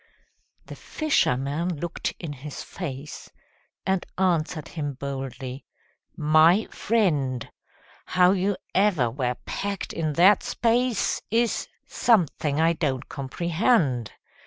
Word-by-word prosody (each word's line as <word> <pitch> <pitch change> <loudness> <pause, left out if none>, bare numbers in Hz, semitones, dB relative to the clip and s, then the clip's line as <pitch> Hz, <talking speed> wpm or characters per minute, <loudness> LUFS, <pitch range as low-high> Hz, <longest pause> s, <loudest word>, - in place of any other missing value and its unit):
The - - -9
fisherman 160 - 0
looked 170 +1 -3
in 160 -4 -5
his 140 +1 -8
face, 145 -5 -7 0.6
And 190 -1 +1
answered 170 -4 0
him 145 -3 -4
boldly: 135 -1 -6 0.5
"My 160 +6 +5
friend, 150 - 0 0.6
How 180 0 +4
you 195 0 0 0.2
ever 180 - +3
were 125 -1 -1
packed 200 -1 -4
in 155 -2 -1
that 185 +6 +6
space 240 0 +1
Is 230 +1 +1 0.2
something 160 - +1
I 165 +1 +4
don't 140 -5 -2
comprehend. 155 - 0
160 Hz, 105 wpm, -25 LUFS, 140-190 Hz, 0.6 s, that